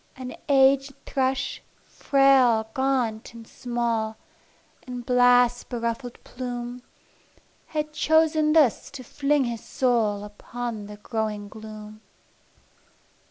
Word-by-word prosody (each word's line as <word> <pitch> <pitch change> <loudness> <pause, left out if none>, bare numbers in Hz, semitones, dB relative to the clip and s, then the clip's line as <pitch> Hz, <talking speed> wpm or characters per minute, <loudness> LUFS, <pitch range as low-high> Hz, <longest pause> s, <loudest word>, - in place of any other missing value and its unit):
An 255 -1 -7
aged 275 0 +4
thrush, 265 0 -1 0.2
frail, 255 -5 +3
gaunt 250 -4 -1
and 230 -1 -11
small, 230 -3 -2 0.7
With 245 -1 -6
blast 245 -1 +4
beruffled 235 0 -4
plume, 245 -1 -6 0.9
Had 305 -1 -3
chosen 315 0 +3
thus 300 -8 +3
to 275 -2 -9
fling 285 +3 +1
his 235 -2 -4
soul 225 -5 0
Upon 215 +1 -6
the 210 0 -10
growing 210 -2 -4
gloom. 215 0 -10
245 Hz, 100 wpm, -25 LUFS, 220-270 Hz, 0.9 s, aged